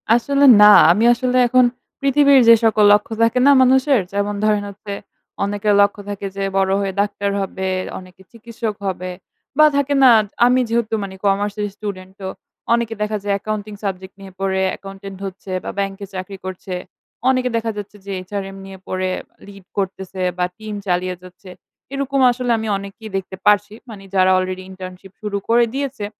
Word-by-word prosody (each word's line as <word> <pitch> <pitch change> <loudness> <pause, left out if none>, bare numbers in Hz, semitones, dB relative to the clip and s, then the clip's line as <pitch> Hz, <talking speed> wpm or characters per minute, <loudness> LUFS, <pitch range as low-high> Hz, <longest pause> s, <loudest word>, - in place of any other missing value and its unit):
আসলে 280 +4 +2 0.2
না। - - +10 0.3
আমি 210 +6 +2
আসলে 250 +1 0
এখন 255 0 +4 0.4
পৃথিবীর 280 0 +5
যে 230 - +10
সকল 215 -1 +3
লক্ষ্য 210 +2 +1
থাকে 230 +2 +3
না - - +8
মানুষের 260 -2 +4
যেমন 205 +1 -1
ধরেন 210 -1 +2
হচ্ছে 200 0 -8 0.5
অনেকের 205 +1 0
লক্ষ্য 200 0 +1
থাকে 200 0 -5
যে 195 - -2
বড় 190 0 +2
হয়ে 195 -1 -2
ডাক্তার 200 -1 -2
হবে, 190 0 -4 0.3
অনেকে 185 0 -16
চিকিৎসক 230 -1 -6
হবে 185 -1 -4 0.5
বা 305 - +7
থাকে 285 0 +1
না 255 - +8 0.3
আমি 250 +1 +4
যেহেতু 230 -1 -1
মানে 190 -1 -7
কমার্স 200 +1 +1
এর - - 0
স্টুডেন্ট 190 -3 -7
তো 190 - -4 0.5
অনেকে 235 -1 0
দেখা 210 0 -1
যায় 200 - +1
অ্যাকাউন্টিং 215 0 -5
সাবজেক্ট 190 -1 -5
নিয়ে 190 -1 -11
পড়ে 190 -1 0 0.2
accountant 195 0 -10
হচ্ছে 190 0 -8
বা - - -4
ব্যাংকে 195 0 -3
চাকরি 190 +1 -6
করছে। 185 0 -6 0.6
অনেকে 255 -1 +1
দেখা 225 0 -2
যাচ্ছে 205 0 -8
যে 200 - -6 0.2
HRM 195 -1 -5
নিয়ে 195 0 -10
পড়ে 185 0 -2 0.4
lead 195 -2 -13
করতেছে 190 -1 -4 0.2
বা 180 - +1
টিম 215 -1 -7
চালিয়ে 180 0 0
যাচ্ছে। 185 +1 -14 0.4
এরকম 275 0 -1
আসলে 245 0 -2
আমি 220 0 -4
অনেককেই 200 +3 -9
দেখতে 190 0 -6
পারছি। 205 0 +3 0.2
মানে 205 -3 -10
যারা 185 0 +4
আলরেডি 185 0 -3
ইন্টার্নশিপ 185 0 -10
শুরু 205 -1 -3
করে 235 +1 +4
দিয়েছে। 270 -6 -3
205 Hz, 170 wpm, -19 LUFS, 190-230 Hz, 0.6 s, না